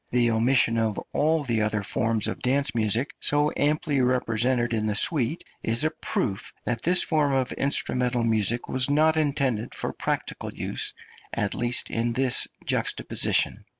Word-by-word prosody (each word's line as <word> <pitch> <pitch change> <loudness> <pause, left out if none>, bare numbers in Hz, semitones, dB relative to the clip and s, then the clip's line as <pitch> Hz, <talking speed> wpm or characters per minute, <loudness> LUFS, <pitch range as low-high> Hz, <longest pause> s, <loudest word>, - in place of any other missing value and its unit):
The 120 -1 +1
omission 115 0 +2
of 110 -2 -1
all 155 +1 +1
the 115 -5 -1
other 105 -1 -1
forms 115 +1 +1
of - - -5
dance 140 +3 +1
music, 115 +4 0
so 145 +1 +1
amply 150 -1 0
represented 125 -1 0
in 110 -1 -1
the 105 - -2
suite, 150 +5 +2 0.2
is 115 +5 +2
a 155 - 0
proof 100 - -3
that 115 -1 -1
this 180 +4 +4
form 150 -3 0
of 130 -1 -1
instrumental 125 -3 0
music 115 +1 0
was 130 +1 +1
not 155 +2 +2
intended 140 -7 -1
for - - -1
practical - - -4
use, - - -2 0.4
at - - -1
least 120 +1 +1
in 115 +1 -1
this 130 0 +4 0.2
juxtaposition. - - +1
125 Hz, 155 wpm, -24 LUFS, 115-140 Hz, 0.4 s, this